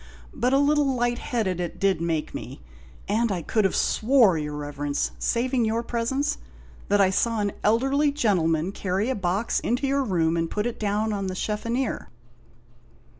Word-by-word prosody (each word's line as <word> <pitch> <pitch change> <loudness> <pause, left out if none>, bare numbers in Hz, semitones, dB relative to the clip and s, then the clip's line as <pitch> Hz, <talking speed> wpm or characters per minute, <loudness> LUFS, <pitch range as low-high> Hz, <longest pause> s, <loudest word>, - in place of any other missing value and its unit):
But 245 +2 0
a 270 - +4
little 285 -1 +2
light 240 +2 -1
'eaded 200 -8 0
it 175 -2 -4
did 195 -4 +2
make 165 -2 -2
me, - - -8 0.4
and 225 +2 +1
I 175 -4 -2
could 215 +2 +2
'ave - - -5
swore, 230 -5 +4
your 150 -1 -3
Eeverence, 145 0 -2
saving 245 +1 +1
your 225 +1 0
presence, 240 +5 -1 0.5
that 205 - +3
I 190 -1 +4
saw 230 +3 +1
an 205 -1 0
elderly 270 +7 +3
gentleman 180 - +1
carry 200 +4 -1
a - - -1
box 195 +3 0
into 245 +4 -1
your 275 0 +1
room 170 -7 +1
and 165 0 -1
put 210 +1 -2
it 240 - -3
down 215 +1 0
on 195 -1 -2
the 185 - -4
sheffoneer." 230 +6 -2
215 Hz, 175 wpm, -25 LUFS, 185-240 Hz, 0.5 s, a